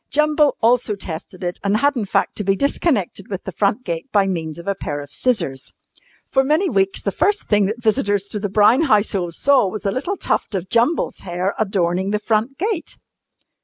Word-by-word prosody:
Jumble 300 0 +2
also 235 -2 +2
tested 185 0 -8
it, 175 0 -3
and 200 +1 +2
had 285 +5 +2
in 230 -4 -1
fact - - 0
to 210 - -1
be 195 0 +2
disconnected 230 - 0
with 195 -2 -5
the 190 - -5
front 205 +6 0
gate 170 +8 -4
by 200 -2 +3
means 165 -5 -3
of 170 - -10
a 200 - +2
pair 145 -6 -5
of 145 0 -10
scissors. 175 - -1 0.6
For 265 - +3
many 310 +7 +1
weeks 195 0 0
the 200 - 0
first 410 - +1
thing 205 -2 +3
that 225 +3 -5
visitors 205 -2 +1
to 210 - -3
the 205 0 -3
Brown 215 - +4
household 200 - +1
saw 275 -7 +4
was 205 +3 -6
a 200 - +1
little 315 - -3
tuft - - -1
of 185 0 -3
Jumble's 240 +8 +1
hair 180 +2 -2
adorning 190 -2 0
the 210 - +1
front 220 +5 -1
gate. 395 -1 -3
205 Hz, 200 wpm, -20 LUFS, 190-255 Hz, 0.6 s, Brown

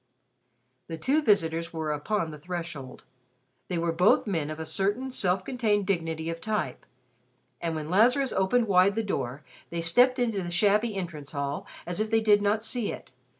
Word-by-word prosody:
The 165 - -5
two 275 - +2
visitors 170 - +1
were 160 -2 -3
upon 160 +3 -1
the 150 - -9
threshold. 165 -5 -6 0.6
They 180 - -2
were 170 0 0
both 180 +5 +4
men 165 -8 -1
of 155 +1 -6
a 160 - -4
certain 205 +11 -1
self 185 -5 0
contained 215 -6 0
dignity 165 -4 -1
of 165 0 -7
type; 215 -1 -3 0.7
and 165 -1 -2
when 155 +1 -4
Lazarus 250 +7 +4
opened 225 +5 +2
wide 195 +1 +4
the 225 - 0
door, 140 - -3 0.3
they 170 0 -3
stepped 245 +10 +4
into 230 -5 0
the 175 - -4
shabby 210 +5 +2
entrance 160 -7 -6
hall 140 0 -3 0.2
as 175 +2 -3
if 215 0 0
they 225 0 +3
did 210 -2 +4
not 210 +2 +1
see 235 -2 -1
it. - - -9
185 Hz, 180 wpm, -27 LUFS, 165-215 Hz, 0.7 s, both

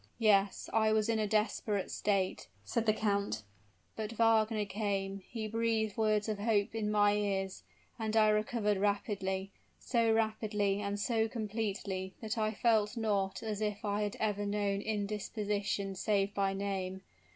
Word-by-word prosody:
"Yes, 205 -3 +3
I 220 -1 +4
was 215 0 +2
in 225 -1 +2
a 215 - +1
desperate 210 -1 0
state," 195 -2 0 0.2
said 225 - -1
the - - +7
count. 200 - 0 0.5
"But 220 0 -4
Wagner 225 -1 +3
came 195 -1 -2
he 225 -2 -4
breathed 225 -1 0
words 215 -1 +2
of 215 -2 -2
hope 205 -1 +1
in 220 -2 -1
my 205 -1 +4
ears, 195 -2 -1 0.4
and 220 0 0
I 215 -1 +6
recovered 210 -1 +1
rapidly; 195 -1 -1 0.3
so 230 -3 +1
rapidly 215 -2 +1
and 200 0 -2
so 225 0 +1
completely 200 -4 -3
that 220 -1 -3
I 215 -1 +1
feel 220 -1 +3
not 200 -4 0
as 215 -2 -3
if 210 -1 -2
I 205 0 0
had 205 -1 -1
ever 205 -2 0
known 200 -1 0
indisposition 205 -1 -2
save 200 +1 0
by 195 -1 +1
name. 190 -1 -3
210 Hz, 150 wpm, -33 LUFS, 200-220 Hz, 0.5 s, the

